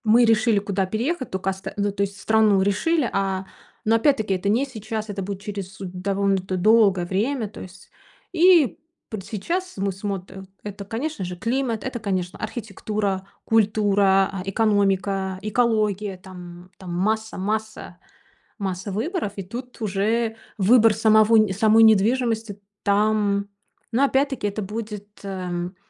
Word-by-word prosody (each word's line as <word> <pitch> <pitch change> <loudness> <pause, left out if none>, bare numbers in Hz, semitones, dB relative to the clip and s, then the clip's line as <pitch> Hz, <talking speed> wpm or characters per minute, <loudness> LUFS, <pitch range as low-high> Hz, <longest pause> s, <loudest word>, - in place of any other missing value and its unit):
Мы 235 +3 +6
решили, 225 -1 +3
куда 200 -1 -1
переехать, 255 - -2
тока 190 0 -1
оста 190 0 -7
ну, 205 0 0
то 200 0 -4
есть 200 0 -2
страну 215 -3 +3
решили, 245 - +1
а 195 -1 -1 0.4
но, 225 +1 +3
опять-таки, 225 -5 +2
это 185 +2 -3
не 230 +7 +2
сейчас, 220 -3 -5
это 200 -1 -4
будет 195 0 -5
через 200 -2 -6
довольно 195 +1 -1
д 185 0 -4
долгое 200 -2 +4
время, 220 +6 -1
то - - -11
есть 185 0 -12 0.4
и 340 - +5 0.3
п 215 - -5
сейчас 335 - -3
мы 195 0 0
смотрим, 190 -1 -6 0.2
это, 205 -1 -7
конечно 240 +1 -4
же, 180 0 -5
климат, 230 +2 -1
это, 260 -2 -4
конечно, 185 -4 -2
архитектура, 205 -3 -3 0.2
культура, 205 -3 +3
а, 195 -2 -5
экономика, 195 -2 +1
экология 215 -2 0
там, 180 -1 -11
там 180 -2 -7
масса 220 +5 -1
масса 215 +2 -3 0.6
масса 190 -1 -4
выборов, 255 - -2
и 195 - -4
тут 245 +6 -8
уже 220 +3 0 0.2
выбор 225 +2 +5
самого 215 +1 +4
нь 215 -3 +3
самой 220 +3 +5
недвижимости 220 0 +2 0.2
там 205 -1 +2 0.4
но, 245 +4 +2
опять-таки, 270 -4 +1
это 205 +1 -3
будет, 210 0 -6 0.2
эм. 180 -2 -4
205 Hz, 145 wpm, -23 LUFS, 195-225 Hz, 0.6 s, Мы